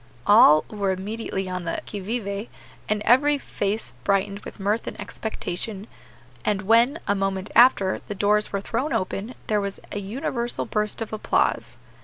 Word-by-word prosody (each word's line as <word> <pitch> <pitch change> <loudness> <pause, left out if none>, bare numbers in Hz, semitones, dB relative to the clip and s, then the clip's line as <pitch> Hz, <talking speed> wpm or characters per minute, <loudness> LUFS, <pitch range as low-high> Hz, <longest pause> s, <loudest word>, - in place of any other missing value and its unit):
All 205 -8 +7
were 200 -2 -1
immediately 195 0 -3
on 180 -1 -4
the 165 - -2
qui 205 - -5
vive, 200 0 -3 0.4
and 210 0 0
every 290 +4 +4
face 210 -5 -3
brightened 200 0 +1
with - - -11
mirth 205 +4 0
and - - -6
expectation; 205 -1 -5 0.6
and 205 -2 0
when, 230 +8 +4
a 200 - +3
moment 195 0 -2
after, 220 -6 +5
the 205 - -4
doors 210 +2 +2
were 200 - -1
thrown 285 +8 -2
open, 195 +6 -2
there 210 -1 +1
was 200 -1 -4
a 205 - -3
universal 235 +3 -2
burst 210 +1 -1
of 220 - -10
applause. 215 - 0
205 Hz, 160 wpm, -24 LUFS, 195-225 Hz, 0.6 s, All